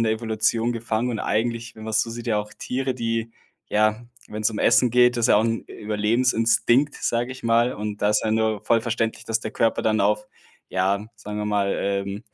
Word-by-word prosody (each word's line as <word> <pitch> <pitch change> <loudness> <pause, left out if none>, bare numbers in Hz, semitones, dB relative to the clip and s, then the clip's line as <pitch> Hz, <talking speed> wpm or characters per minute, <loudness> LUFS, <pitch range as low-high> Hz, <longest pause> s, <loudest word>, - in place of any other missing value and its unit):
in - - +3
der 110 -1 +2
Evolution 115 +1 0
gefangen. 115 +1 -2
Und 110 - -3
eigentlich, 115 +1 -2
wenn 110 - -9
man's 110 0 +1
so 115 - -6
sieht, 120 +1 -7
ja 110 -3 +1
auch 105 0 -5
Tiere, 130 +1 -3
die 115 -1 -2 0.4
ja, 110 +2 +2 0.2
wenn's 105 +1 -1
um 105 - -5
Essen 125 - +4
geht 125 +1 +4
das 120 - 0
ist - - -3
ja - - +6
auch 110 - +3
'n 115 0 -1
Überlebensinstinkt, 115 +4 +1
sage 120 +2 -1
ich 130 - -12
mal. 115 +2 +3
Und 105 0 -5
da 105 - +3
ist 105 - +2
ja 110 - 0
nur 110 -2 0
voll 115 +1 +3
verständlich, 115 0 -2
dass 115 0 0
der 110 0 -6
Körper 115 - +1
dann 110 -1 +2
auf, 105 +1 +1 0.4
ja, 100 +3 0
sagen 105 0 -7
wir 105 - -2
mal, 100 -1 +1
ähm, 100 0 -2
110 Hz, 220 wpm, -23 LUFS, 105-115 Hz, 0.4 s, ja